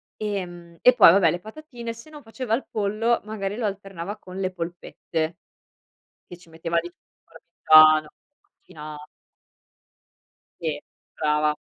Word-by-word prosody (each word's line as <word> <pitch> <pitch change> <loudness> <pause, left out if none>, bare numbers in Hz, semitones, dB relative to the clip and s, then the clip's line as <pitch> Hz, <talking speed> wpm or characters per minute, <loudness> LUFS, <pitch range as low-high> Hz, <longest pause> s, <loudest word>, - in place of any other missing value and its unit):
ehm, 175 -5 -6
e 250 - +7
poi 220 -8 +8
vabbè 175 -3 +4
le 175 - -3
patatine. 235 - -8
Sennò 295 +7 -12
faceva 230 0 -5
il 265 - -5
pollo 215 +3 0
magari 205 -1 -4
lo 235 - -2
alternava 195 -1 -5
con 185 -2 -11
le 190 -1 -1
polpette 165 -1 -5 0.9
che 175 - -10
ci 175 - -20
metteva 165 +1 -2
di 170 - -8
tutto, 175 - -37
il 165 - -15 0.2
parmigiano, 155 0 +7 0.5
macina 150 -3 -11 1.5
Sì. 155 -3 -3 0.4
Brava. 150 0 +1
185 Hz, 135 wpm, -24 LUFS, 165-215 Hz, 1.5 s, poi